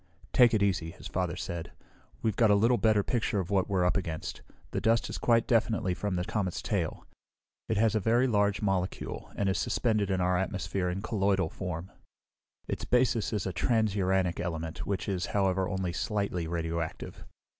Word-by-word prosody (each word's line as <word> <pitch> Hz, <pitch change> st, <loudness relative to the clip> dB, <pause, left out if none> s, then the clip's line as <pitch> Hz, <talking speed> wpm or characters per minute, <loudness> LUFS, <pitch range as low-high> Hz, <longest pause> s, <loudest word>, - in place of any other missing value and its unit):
"Take 120 Hz, -2 st, +6 dB
it 105 Hz, -, +2 dB
easy," 95 Hz, -5 st, +1 dB
his 90 Hz, -, -12 dB
father 90 Hz, -2 st, -2 dB
said. 85 Hz, -1 st, -5 dB, 0.5 s
"We've 110 Hz, -3 st, +1 dB
got 115 Hz, -1 st, +4 dB
a 105 Hz, -, +6 dB
little 115 Hz, +4 st, +3 dB
better 110 Hz, -2 st, +3 dB
picture 110 Hz, -3 st, 0 dB
of 95 Hz, 0 st, -3 dB
what 95 Hz, -1 st, +2 dB
we're 95 Hz, -2 st, +2 dB
up 90 Hz, -, +2 dB
against. 85 Hz, -5 st, -3 dB, 0.3 s
The -, -, -2 dB
dust 115 Hz, +1 st, +2 dB
is -, -, -4 dB
quite 115 Hz, -1 st, +3 dB
definitely 110 Hz, -5 st, +1 dB
from 100 Hz, +1 st, -2 dB
the 90 Hz, 0 st, -1 dB
comet's 105 Hz, -4 st, -2 dB
tail. -, -, -2 dB, 0.6 s
It 110 Hz, -, +1 dB
has 110 Hz, +1 st, +3 dB
a 110 Hz, -, +2 dB
very 115 Hz, +5 st, +3 dB
large 105 Hz, -4 st, +1 dB
molecule, 95 Hz, -2 st, -2 dB
and 100 Hz, -, 0 dB
is 95 Hz, -, +1 dB
suspended 110 Hz, -5 st, +1 dB
in 95 Hz, -1 st, +1 dB
our 90 Hz, 0 st, +2 dB
atmosphere 95 Hz, -1 st, -2 dB
in 95 Hz, +3 st, -3 dB
colloidal 100 Hz, -6 st, +1 dB
form. 90 Hz, 0 st, -5 dB, 0.8 s
Its -, -, -3 dB
basis 125 Hz, -3 st, +2 dB
is 105 Hz, -4 st, -1 dB
a 95 Hz, -, -2 dB
transuranic 95 Hz, -5 st, +1 dB
element, 80 Hz, -2 st, -4 dB
which 100 Hz, -2 st, -2 dB
is, 95 Hz, -2 st, -1 dB
however, 95 Hz, -1 st, +1 dB
only 95 Hz, -2 st, -2 dB
slightly 100 Hz, -4 st, -1 dB
radioactive. 85 Hz, -1 st, -4 dB
95 Hz, 180 wpm, -29 LUFS, 90-110 Hz, 0.8 s, Take